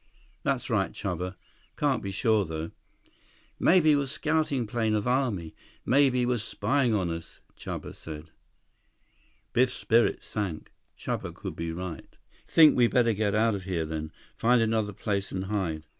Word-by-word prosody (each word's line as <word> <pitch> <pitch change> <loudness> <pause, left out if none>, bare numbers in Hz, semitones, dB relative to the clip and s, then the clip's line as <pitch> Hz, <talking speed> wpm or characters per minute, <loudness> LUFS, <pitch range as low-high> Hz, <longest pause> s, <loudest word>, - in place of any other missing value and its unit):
"That's - - -1
right, - - +1
Chuba. 90 0 -4 0.4
Can't 140 -5 +1
be 100 - -4
sure, 110 +2 +2
though." 80 -1 -5 0.9
"Maybe 160 -4 +5
was 140 -2 0
scouting 150 -4 0
plane 110 0 0
of 105 +2 -1
army. 120 -11 0 0.3
Maybe 130 -2 +4
was 120 -2 0
spying 130 +2 0
on 90 -4 0
us," 85 0 -7 0.2
Chuba - - -6
said. 80 0 -9 1.2
Biff's 125 +1 +3
spirits 115 +1 +2
sank. 100 -7 -4 0.3
Chuba - - -3
could - - -7
be 85 0 -3
right. 85 -1 -7 0.3
"Think 155 -2 +7
we 120 -2 +5
better 115 -1 +3
get 105 -1 0
out 110 +1 +3
of 95 -2 -5
here 85 -4 -1
then? 80 0 -5 0.2
Find 120 +1 +3
another 110 -2 +1
place 100 -1 -2
and 95 0 -3
hide?" 95 -6 -2
110 Hz, 150 wpm, -28 LUFS, 90-125 Hz, 1.2 s, Think